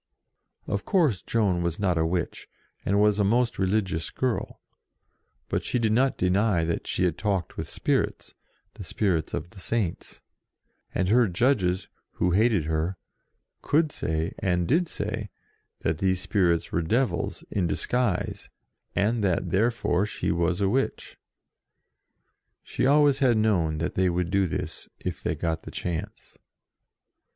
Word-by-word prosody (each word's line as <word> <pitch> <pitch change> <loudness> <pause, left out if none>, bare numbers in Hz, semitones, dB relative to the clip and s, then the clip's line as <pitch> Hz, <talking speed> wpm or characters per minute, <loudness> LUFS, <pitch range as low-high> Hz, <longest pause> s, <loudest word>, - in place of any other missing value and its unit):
Of - - -2
course 155 - +2
Joan 100 -6 +1
was 85 -1 -1
not 95 -4 +1
a 80 0 +1
witch, 85 0 -3 0.3
and 100 +1 +2
was 105 0 +3
a - - +4
most 120 +4 +1
religious 95 -4 0
girl, 130 -3 -2 0.9
but - - -1
she - - -1
did 115 -3 +1
not 130 +4 +2
deny 95 0 +2
that 85 - -2
she - - 0
had 90 -3 0
talked 100 -6 -1
with - - -5
spirits, - - -1 0.4
the - - -9
spirits 90 -7 0
of 85 - -5
the 95 - -13
Saints; 95 -3 -2 0.8
and 95 - +1
her 120 +1 +5
judges, 95 -2 +1 0.3
who 90 - +1
hated 105 -3 +3
her, 80 +4 -1 0.6
could 155 0 +2
say, 80 - -2
and 90 -2 0
did 170 +5 +2
say, 105 -2 -4 0.5
that 80 -1 -1
these 95 -1 +1
spirits 85 -4 +1
were 85 - +1
devils, 115 +10 0
in 95 -4 +1
disguise, 120 +1 -1 0.5
and 110 +2 +1
that 90 -2 0
therefore 105 -2 +1
she - - -2
was 85 +2 0
a 100 - +3
witch. 130 +7 -1 1.5
She - - -1
always 145 -1 +5
had 125 -5 +4
known 90 -8 +2
that 85 +3 -2
they 95 0 +2
would 90 0 -1
do 100 -1 +2
this, - - -5
if - - -4
they - - -1
got 80 -1 -2
the - - -10
chance. 85 -2 -5
95 Hz, 150 wpm, -26 LUFS, 85-115 Hz, 1.5 s, her